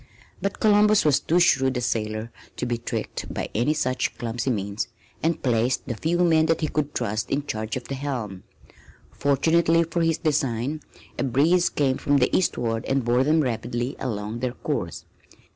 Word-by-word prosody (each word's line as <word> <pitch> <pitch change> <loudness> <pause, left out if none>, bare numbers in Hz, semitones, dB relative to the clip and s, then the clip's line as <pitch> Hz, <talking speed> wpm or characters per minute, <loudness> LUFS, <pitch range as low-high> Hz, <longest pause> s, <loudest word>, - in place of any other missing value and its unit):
But 200 - -2
Columbus 210 -1 +4
was 150 -3 +4
too 170 +3 +2
shrewd 135 -6 +3
a - - -1
sailor 110 -2 -2 0.3
to - - -2
be 120 -1 -2
tricked 120 - -4
by - - -4
any 125 +8 +1
such 130 -3 -1
clumsy 120 +2 -2
means 100 -3 -2 0.3
and 165 0 0
placed 120 0 +1
the - - -3
few 160 +9 -1
men 160 -2 +4
that 165 0 +1
he 155 - 0
could 150 -1 -2
trust 105 0 -2
in 140 +1 -1
charge 110 -2 -3
of 125 - -6
the 135 - -6
helm. 125 -9 -4 0.7
Fortunately 165 +4 +3
for 170 +1 -2
his 165 -1 +2
design 145 -2 -1 0.4
a - - +1
breeze 155 +8 +3
came 135 -3 0
from 145 0 +2
the 125 - +2
eastward 115 -10 0
and 135 -2 0
bore 120 +2 +3
them 155 +3 +3
rapidly 120 0 -2
along 110 -1 -3
their 125 0 -2
course. - - -4
130 Hz, 175 wpm, -24 LUFS, 120-155 Hz, 0.7 s, Columbus